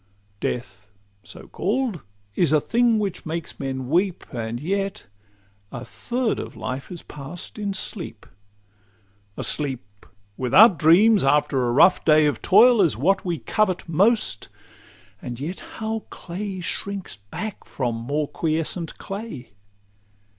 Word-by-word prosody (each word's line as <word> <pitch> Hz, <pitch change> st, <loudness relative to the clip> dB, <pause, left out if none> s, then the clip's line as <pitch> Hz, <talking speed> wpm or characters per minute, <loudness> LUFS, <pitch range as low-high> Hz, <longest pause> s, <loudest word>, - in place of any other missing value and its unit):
Death, 105 Hz, -3 st, -4 dB, 0.3 s
so -, -, -12 dB
call'd, 225 Hz, -, -1 dB, 0.3 s
is 170 Hz, -, +2 dB
a 155 Hz, -, +5 dB
thing 235 Hz, -, +2 dB
which 200 Hz, -4 st, -2 dB
makes 165 Hz, 0 st, -5 dB
men 130 Hz, -2 st, -3 dB
weep, 180 Hz, +5 st, +1 dB
And 115 Hz, -1 st, -3 dB
yet 195 Hz, +6 st, -2 dB, 0.7 s
a 120 Hz, +1 st, -7 dB
third 245 Hz, -1 st, -2 dB
of -, -, -7 dB
life 130 Hz, +5 st, -5 dB
is 175 Hz, -, -7 dB
pass'd 150 Hz, +8 st, -9 dB
in 205 Hz, -1 st, -2 dB
sleep. 170 Hz, -, -3 dB, 1.1 s
A -, -, -3 dB
sleep 115 Hz, -9 st, -2 dB, 0.3 s
without 160 Hz, -, +6 dB
dreams, 195 Hz, +7 st, +6 dB
after 135 Hz, -2 st, +2 dB
a -, -, +1 dB
rough 175 Hz, +9 st, +5 dB
day 155 Hz, -1 st, +5 dB
Of 145 Hz, -5 st, 0 dB
toil, 230 Hz, +3 st, +6 dB
is 160 Hz, -, +3 dB
what 190 Hz, +10 st, +2 dB
we 175 Hz, -3 st, -1 dB
covet 190 Hz, +1 st, 0 dB
most; 200 Hz, +8 st, +2 dB, 0.7 s
and 120 Hz, -1 st, -6 dB
yet 165 Hz, +7 st, -4 dB
How 220 Hz, 0 st, -5 dB
clay 185 Hz, +1 st, -6 dB
shrinks 200 Hz, +2 st, -4 dB
back 140 Hz, -, -7 dB
from 120 Hz, -4 st, -3 dB
more 140 Hz, +6 st, -2 dB
quiescent 165 Hz, +2 st, -2 dB
clay! 195 Hz, -, -7 dB
170 Hz, 130 wpm, -23 LUFS, 135-200 Hz, 1.1 s, without